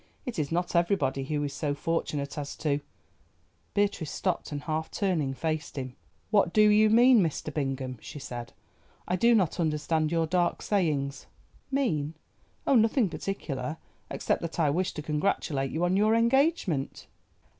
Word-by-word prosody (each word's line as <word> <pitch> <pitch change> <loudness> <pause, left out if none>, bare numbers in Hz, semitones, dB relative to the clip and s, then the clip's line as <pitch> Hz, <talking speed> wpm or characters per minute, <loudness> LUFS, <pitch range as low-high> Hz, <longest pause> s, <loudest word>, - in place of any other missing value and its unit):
It 245 -9 -4
is 145 -1 -2
not 175 +1 -1
everybody 170 -7 +1
who 145 +1 -1
is 140 -1 -3
so 145 -1 -2
fortunate 145 -2 -2
as 145 -1 -5
to——" 145 -2 0 1.0
Beatrice 200 -6 +1
stopped, 185 -4 -2
and 145 0 -4
half 160 0 -2
turning 160 -9 -1
faced 155 +2 -3
him. 130 -1 -5 0.4
"What 200 -5 +3
do 215 0 +6
you 215 +1 +5
mean, 240 +2 +6
Mr. 155 -2 -2
Bingham?" 135 -4 -3
she - - -9
said. 120 -4 -7 0.6
"I 180 - +1
do 235 +6 +4
not 185 -5 +1
understand 155 0 0
your 165 -1 +2
dark 175 +1 0
sayings." 150 -9 0 0.4
"Mean! 165 - 0 0.5
oh, - - +3
nothing 225 -2 +4
particular, 160 -5 -4 0.3
except - - -1
that 170 0 -5
I 150 -3 +3
wished 180 +4 -1
to 150 - -5
congratulate 150 -3 0
you 165 +5 0
on 180 +1 +2
your 215 +3 +4
engagement." 235 - +1
160 Hz, 155 wpm, -28 LUFS, 145-200 Hz, 1.0 s, do